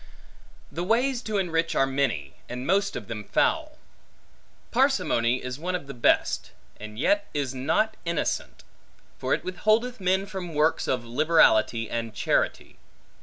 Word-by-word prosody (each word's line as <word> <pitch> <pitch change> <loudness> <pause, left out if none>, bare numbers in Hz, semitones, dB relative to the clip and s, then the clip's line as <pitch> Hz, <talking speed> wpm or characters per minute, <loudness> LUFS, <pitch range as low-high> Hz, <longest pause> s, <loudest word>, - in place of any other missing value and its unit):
The 165 +5 -3
ways 240 +5 +1
to 215 -4 -2
enrich 165 -3 0
are 135 - +4
many, 135 - -1 0.2
and 125 +1 -5
most 200 +4 +1
of - - -6
them 110 -2 -5
foul. - - 0 0.9
Parsimony 120 +2 +2
is 125 +2 -5
one 180 +3 -2
of 175 - -4
the 140 - -8
best, 120 - +1 0.3
and 105 0 -9
yet 305 - +2
is 140 -3 -1
not 160 +12 0
innocent; 170 0 -2 0.6
for - - +1
it - - -7
withholdeth 215 +7 +1
men 190 +1 +1
from 190 -5 -6
works 155 +2 +2
of 125 -2 -1
liberality 120 -4 +3
and 115 -2 -4
charity. - - -1
160 Hz, 145 wpm, -26 LUFS, 125-195 Hz, 0.9 s, are